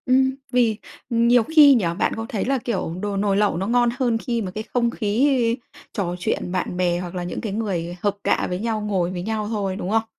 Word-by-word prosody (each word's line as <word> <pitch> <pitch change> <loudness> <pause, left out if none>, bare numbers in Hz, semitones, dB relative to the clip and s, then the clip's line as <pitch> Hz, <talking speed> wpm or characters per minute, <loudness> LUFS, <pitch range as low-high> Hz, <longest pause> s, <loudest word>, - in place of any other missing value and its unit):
Ừm. 265 +1 +3 0.2
Vì 235 -4 +2 0.3
nhiều 235 0 +4
khi 300 0 +7
nhỉ, 220 -7 +1
bạn - - +1
có 225 - -4
thấy 215 - -2
là, 270 +1 +1
kiểu, 220 -9 -3
đồ 205 -1 -2
nồi 200 0 +1
lẩu 205 -5 +2
nó 190 +2 -2
ngon 240 +1 +3
hơn 240 -3 +2
khi 235 0 -2
mà 190 -3 -4
cái 215 +3 -5
không 235 -1 +2
khí 235 +2 +1 0.4
trò 180 -4 -2
chuyện 175 0 -2
bạn 180 -1 -2
bè 175 -1 +1
hoặc 180 0 -6
là 180 - -3
những 175 - -4
cái 215 -4 -4
người 180 -5 -3
hợp 205 -1 0
cạ - - +1
với 180 0 -2
nhau 220 0 -1
ngồi 190 -4 0
với 180 -1 -4
nhau 215 +2 -2
thôi, 200 -4 -2
đúng 190 -2 -4
không? 220 +1 +2
215 Hz, 235 wpm, -22 LUFS, 190-235 Hz, 0.4 s, khi